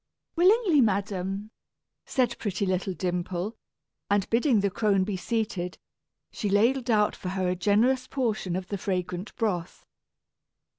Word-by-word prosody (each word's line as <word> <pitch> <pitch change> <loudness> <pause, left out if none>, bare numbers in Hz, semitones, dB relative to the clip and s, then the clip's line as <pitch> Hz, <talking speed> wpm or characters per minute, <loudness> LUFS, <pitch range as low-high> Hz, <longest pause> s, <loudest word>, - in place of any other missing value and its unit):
"Willingly, 365 - +5 0.2
dame," 195 +1 -5 0.6
said 245 -3 +1
pretty 200 -2 -1
little 185 0 -1
Dimple; 180 +3 -2 0.5
and 200 -1 +2
bidding 235 -1 +3
the 200 -1 +1
crone 200 -2 +2
be 200 0 -2
seated, 195 -3 -2 0.5
she 210 - -3
ladled 235 +5 +2
out 210 -2 +3
for 180 - -5
her 185 -1 -1
a 180 - 0
generous 220 +8 +2
portion 215 -9 -1
of 185 0 -4
the 200 - -3
fragrant 180 0 -3
broth. 185 -7 -2
200 Hz, 135 wpm, -27 LUFS, 185-230 Hz, 0.6 s, Willingly